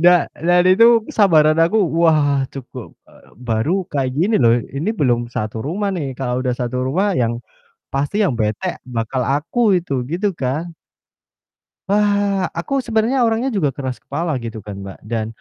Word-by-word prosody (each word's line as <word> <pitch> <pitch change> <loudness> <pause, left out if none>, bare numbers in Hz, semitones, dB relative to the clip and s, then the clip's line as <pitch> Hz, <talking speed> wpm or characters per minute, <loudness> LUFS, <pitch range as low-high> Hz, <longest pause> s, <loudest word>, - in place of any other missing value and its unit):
Da 175 0 +5 0.2
dan 175 0 +5
itu 230 +4 +5
kesabaran 155 -7 +4
aku, 175 +7 +2 0.2
wah, 150 -4 +3
cukup 135 -3 -9
eee, - - -21 0.2
baru 115 +6 0 0.2
kayak 135 -5 -1
gini 205 +6 +2
loh, 115 +1 +5 0.2
ini 165 +10 -1
belum 120 - 0
satu 110 -1 -4
rumah 200 +7 -2
nih, 140 -7 -4
kalau 125 -1 -2
udah 125 -2 0
satu 125 +1 -2
rumah 190 +9 +1
yang 120 -5 0 0.6
pasti 145 +10 0
yang 190 -10 +2
bete 105 -1 -2
bakal 125 +1 -3
aku 180 - +1
itu, 155 -5 -5
gitu 180 +9 -1
kan. 140 +6 -2 1.2
Wah, 205 -2 +2
aku 275 +11 -2
sebenarnya 230 +3 +2
orangnya 230 +3 0
juga 170 - 0
keras 130 -2 -5
kepala 155 0 -3
gitu 115 -2 -7
kan, 100 0 -8
Mbak, 95 - -9
dan 110 0 -3
150 Hz, 160 wpm, -19 LUFS, 125-200 Hz, 1.2 s, Da